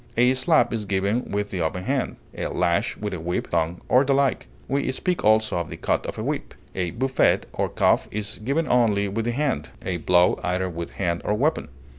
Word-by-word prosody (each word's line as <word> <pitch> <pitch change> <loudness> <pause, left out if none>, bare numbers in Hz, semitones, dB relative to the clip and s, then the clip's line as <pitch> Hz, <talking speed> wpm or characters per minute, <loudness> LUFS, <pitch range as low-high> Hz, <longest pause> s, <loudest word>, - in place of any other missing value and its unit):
A 125 +2 +5
slap 130 +4 +3
is 110 -2 -2
given 100 +5 0
with 105 0 -2
the 90 - -2
open 85 +3 -2
hand, 130 +3 -1 0.2
a - - -3
lash 85 +1 0
with 105 -1 -4
a 90 - -4
whip, 85 +2 -3
thong, 85 +1 0
or 130 +2 +5
the 135 0 +2
like; 140 -1 +1 0.2
we 140 -1 0
speak 180 +6 -1
also 110 -3 +3
of 85 - -4
the - - -7
cut - - -1
of - - -5
a - - -3
whip. - - -3 0.2
A 90 -2 -1
buffet 130 +9 +2
or - - -1
cuff - - +2
is 105 0 -4
given 140 +8 0
only 110 -5 +3
with 110 +3 -2
the 120 - +1
hand; 130 - -1 0.2
a 90 -2 -1
blow 90 +1 +3
either 90 +1 -1
with 85 0 -5
hand 85 -3 -1
or 105 - 0
weapon. 150 +8 0
105 Hz, 215 wpm, -24 LUFS, 90-130 Hz, 0.2 s, A